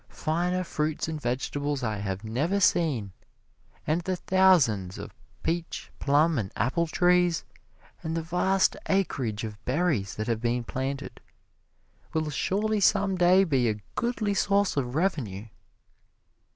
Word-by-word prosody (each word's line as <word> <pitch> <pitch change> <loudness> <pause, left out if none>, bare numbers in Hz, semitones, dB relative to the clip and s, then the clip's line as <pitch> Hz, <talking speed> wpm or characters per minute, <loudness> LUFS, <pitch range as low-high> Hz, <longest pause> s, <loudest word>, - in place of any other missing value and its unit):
Finer 175 +3 -1
fruit 155 -3 -2
and 155 -2 -4
vegetables 140 +3 -2
I 110 -2 -1
have 100 0 -4
never 145 - 0
seen, 145 - +2 0.7
and 160 +3 +1
the 185 +2 -2
thousands 165 - +3
of - - -8 0.3
peach, 170 0 -3
plum 145 +1 +3
and 95 -3 -4
apple 135 +11 0
trees, 175 0 +2 0.6
and 160 +1 -3
the 165 - -2
vast 185 +3 +2
acreage 130 - 0
of 105 -1 -7
berries 130 - 0
that 110 - -3
have 115 -1 -1
been 120 0 0
planted, 135 +3 -4 0.9
will 155 -1 -1
surely 210 - 0
some 200 -1 +3
day 180 +2 +5
be 135 -9 +2
a 105 -1 -2
goodly 230 -4 -1
source 200 0 +2
of 130 -2 -2
revenue. 140 - -1
155 Hz, 135 wpm, -27 LUFS, 120-180 Hz, 0.9 s, day